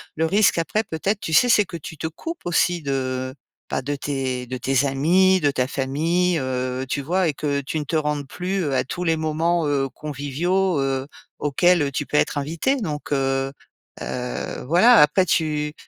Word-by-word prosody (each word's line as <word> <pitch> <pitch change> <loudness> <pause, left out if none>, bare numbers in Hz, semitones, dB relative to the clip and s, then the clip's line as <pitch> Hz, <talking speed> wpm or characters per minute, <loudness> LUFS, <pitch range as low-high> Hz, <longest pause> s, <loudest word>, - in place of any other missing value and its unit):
le 160 - +1
risque, 195 +2 +3
après, 210 +6 0
peut-être, 195 +5 -2
tu 160 - -4
sais, 245 - +6
c'est 210 -3 +5
que 175 - -7
tu 160 0 -9
te 160 - -3
coupes 330 - -7
aussi 175 0 +1
de 130 -2 -2 0.3
bah, - - -1
de 145 +2 -3
tes 130 -3 -3
de 130 +1 -5
tes 135 +2 +1
amis, 180 +8 +3
de 145 - +3
ta 130 -2 0
famille, 165 +7 0
heu, 130 0 -2
tu 140 - -2
vois 180 +5 +1
et 150 - 0
que 140 0 -1
tu 155 +3 -3
ne - - -3
te 160 - -4
rendes 150 -2 -1
plus, 185 +5 -3
heu, 140 -4 -1
à - - +2
tous 180 +7 -5
les 165 -2 +1
moments, 160 +2 0
heu, 135 -2 0
conviviaux, 150 +6 -1
heu, 135 0 -1 0.3
auxquels, 175 +4 +3
heu, 140 -1 0
tu 145 +2 -2
peux - - -5
être - - +1
invitée. 165 - 0
Donc 150 - -5
heu 135 -1 0 0.5
heu, 125 0 -4
voilà. 220 +9 +6
Après 150 +6 +4
tu, 150 -2 0
150 Hz, 195 wpm, -22 LUFS, 135-175 Hz, 0.5 s, sais